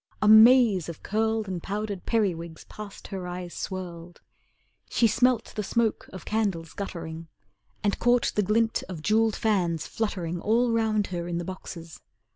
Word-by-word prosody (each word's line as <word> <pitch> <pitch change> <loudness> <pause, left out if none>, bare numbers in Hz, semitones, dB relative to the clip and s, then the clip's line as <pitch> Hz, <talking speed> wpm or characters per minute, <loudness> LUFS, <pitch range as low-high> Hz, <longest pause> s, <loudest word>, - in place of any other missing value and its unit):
A 210 - +1
maze 220 - +7
of 170 - -9
curled 220 0 0
And 185 -2 -4
powdered 205 -1 -4
periwigs 170 -8 -1
past 210 -2 -10
her 190 -2 -5
eyes 180 -1 -6
swirled. 175 -2 -6 0.7
She 235 - +2
smelt 240 +2 +2
the 210 - -2
smoke 225 +2 -1
of 185 - -9
candles 195 -7 -1
guttering, 165 -4 -6 0.6
And 205 -1 0
caught 245 0 +3
the 210 - +2
glint 225 +3 +1
of 165 -4 -7
jewelled 220 +2 +2
fans 175 -7 0
fluttering 175 -6 -3
All 235 +3 +2
round 220 -2 +1
her 170 -1 -3
in 175 -1 -2
the 175 - -3
boxes. 165 -5 -8
200 Hz, 155 wpm, -26 LUFS, 175-220 Hz, 0.7 s, maze